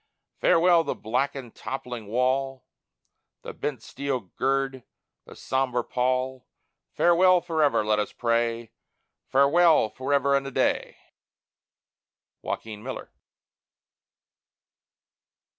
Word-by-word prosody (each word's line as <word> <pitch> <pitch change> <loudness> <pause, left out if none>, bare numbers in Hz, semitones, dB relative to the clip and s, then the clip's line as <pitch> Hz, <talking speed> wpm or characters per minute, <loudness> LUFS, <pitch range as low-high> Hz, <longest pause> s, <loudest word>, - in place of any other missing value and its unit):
Farewell 170 0 +4
the - - -3
blackened, 125 +2 -3
toppling 125 -5 -6
wall, 130 +3 -1 0.8
The - - -7
bent 130 -6 -4
steel 140 -2 -3
gird, 135 +5 -2 0.4
the - - -13
sombre 130 -2 -1
pall 130 +1 -1 0.4
Farewell 180 +1 +4
forever, 160 -9 +1
let 105 0 +2
us 105 - -2
pray; 115 -1 -1 0.6
Farewell, 145 -1 +4
forever 140 +1 +1
and 135 0 0
a - - -3
day! 135 - -1 1.5
JOAQUIN 110 -2 -5
MILLER. 130 +3 -7
130 Hz, 90 wpm, -26 LUFS, 120-140 Hz, 1.5 s, Farewell